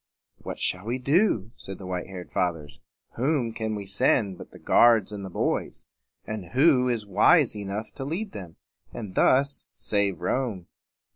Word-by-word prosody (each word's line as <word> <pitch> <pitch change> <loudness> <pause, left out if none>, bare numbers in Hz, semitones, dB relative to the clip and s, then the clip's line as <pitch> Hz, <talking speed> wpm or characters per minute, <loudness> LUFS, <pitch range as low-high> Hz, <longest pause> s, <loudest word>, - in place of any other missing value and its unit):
"What - - -6
shall 90 +2 -2
we 120 +3 -1
do?" 130 - +2
said 95 - -8
the 95 - -10
white 90 -1 -4
haired 95 -2 -9
Fathers. 80 -6 -2 0.4
"Whom 130 -2 0
can 110 -1 -3
we 100 -1 -5
send 100 -1 +1
but - - -10
the - - -14
guards 115 -4 +4
and 100 -1 -6
the 95 - -6
boys? - - -2 0.4
and 110 -2 -5
who 130 -3 +4
is 115 -3 -1
wise 110 - +4
enough 105 +1 -5
to - - -6
lead 180 +9 -3
them, 90 - -9 0.4
and 105 -6 -7
thus 140 +7 +2
save 100 -2 0
Rome?" 100 -1 -2
110 Hz, 165 wpm, -26 LUFS, 95-130 Hz, 0.4 s, guards